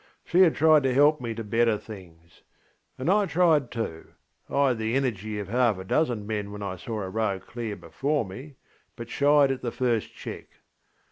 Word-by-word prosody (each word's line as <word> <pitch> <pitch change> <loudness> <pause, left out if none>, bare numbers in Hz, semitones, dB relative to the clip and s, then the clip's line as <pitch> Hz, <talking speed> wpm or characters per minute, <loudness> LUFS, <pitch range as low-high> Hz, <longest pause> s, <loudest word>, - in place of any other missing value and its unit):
She 180 +2 +3
had 175 -4 +5
tried 155 0 +5
to 130 -2 0
help 145 +1 +4
me 115 -2 -4
to 115 - -5
better 115 +1 +2
things. 85 -6 -13 0.6
And 130 - -4
I 200 +2 +3
tried 165 -7 +3
tooŌĆöI 95 -9 -5 0.6
had 125 - 0
the 110 +2 -1
energy 110 -6 -2
of 100 -2 -5
half 120 -1 +2
a 95 - -7
dozen 120 -1 0
men 105 -1 -3
when 105 0 -7
I 95 -2 -4
saw 105 +3 -5
a 95 - -5
road 100 -3 -2
clear 115 -3 -5
before 140 +4 -2
me, 130 +10 -10 0.4
but 115 -1 -8
shied 145 -1 +4
at 135 - -3
the 120 - -3
first 120 -4 -1
check. - - -8
115 Hz, 190 wpm, -26 LUFS, 105-140 Hz, 0.6 s, had